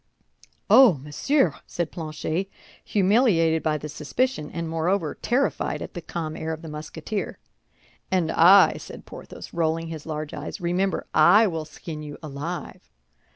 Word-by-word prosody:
"Oh, 255 -10 +7
monsieur!" 150 - +1
said 170 -2 -3
Planchet, 160 +3 -3 0.3
humiliated 190 -6 +3
by 155 -1 0
the 150 - -7
suspicion, 150 - -2
and 170 0 -4
moreover, 165 +1 0
terrified 260 +3 0
at - - -9
the 175 - -6
calm 160 -1 -5
air 160 - -4
of 160 +1 -8
the 160 - -7
Musketeer. 155 +7 -5 0.7
"And 180 -4 +1
I," 185 +4 +7
said - - -10
Porthos, - - -10
rolling 165 0 -1
his 160 -1 -7
large 155 -1 -4
eyes, 145 - -6
"remember, 180 +2 -1
I 175 +8 +6
will 165 -6 -2
skin 155 0 -8
you 150 -1 -8
alive." 150 - -6
165 Hz, 145 wpm, -25 LUFS, 155-190 Hz, 0.7 s, Oh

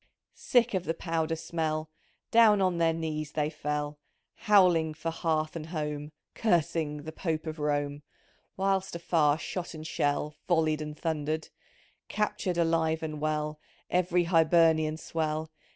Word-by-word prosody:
Sick 245 -2 +2
of 185 -2 -1
the 165 - -1
powder 165 -1 -1
smell, 155 -1 -3 0.4
Down 225 -3 +6
on 185 -3 +1
their 165 -1 +4
knees 155 -2 -3
they 150 0 0
fell, 150 -1 -2 0.5
• - - -23
Howling 180 -7 +5
for 165 +1 -3
hearth 155 -1 -1
and 160 -1 -5
home 150 -2 -4
— - - -60
Cursing 160 -6 0
the 160 - -6
Pope 160 -1 -3
of 155 0 -5
Rome 145 -1 -1 0.3
— - - -39
Whilst 190 -1 0
afar 160 -3 +2
shot 175 +2 -5
and 155 0 -8
shell 150 -1 -1
Volleyed 160 -3 +2
and 150 0 -6
thundered; 155 -1 -2 0.6
Captured, 210 -4 -1
alive 165 -1 +1
and 155 -1 -4
well, 150 0 -1 0.3
Ev'ry 180 0 +2
Hibernian 160 -2 +4
swell. 160 -1 -2
160 Hz, 150 wpm, -29 LUFS, 155-170 Hz, 0.6 s, Down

